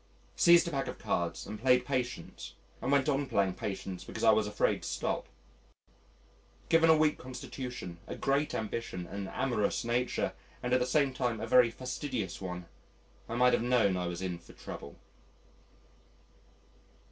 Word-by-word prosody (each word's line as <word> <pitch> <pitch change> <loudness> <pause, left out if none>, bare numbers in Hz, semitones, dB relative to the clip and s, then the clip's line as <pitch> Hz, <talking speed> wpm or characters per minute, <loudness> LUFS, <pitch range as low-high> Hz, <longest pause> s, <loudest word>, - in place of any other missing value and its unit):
Seized 170 0 +6
a - - -2
pack 135 -3 -1
of - - -5
cards 85 -1 -2
and 105 +1 -7
played 125 -1 +4
Patience 125 -9 -4 0.3
and 130 - -1
went 140 -1 +3
on 140 -1 +1
playing 100 -5 +1
Patience 95 -3 -5
because - - -6
I - - +7
was 110 -1 +2
afraid 105 - +1
to - - -5
stop. - - -2 1.4
Given 165 0 +5
a 160 - +7
weak 155 -1 +2
constitution, 125 -7 -7
a - - -5
great 140 +2 0
ambition, 110 -4 -3
an 100 +2 -5
amorous 120 -2 0
nature, 120 +1 0 0.3
and 125 0 0
at 130 - +5
the 125 - 0
same 140 0 +2
time 125 -3 -1
a 110 - -3
very 120 +1 +6
fastidious 125 - -4
one, 90 -2 -5 0.6
I 115 - -3
might 125 +1 +5
have - - +3
known 120 -5 +3
I 90 -1 -1
was 90 +1 -4
in 90 -2 -3
for - - -16
trouble. 70 - -9
125 Hz, 165 wpm, -31 LUFS, 100-130 Hz, 1.4 s, I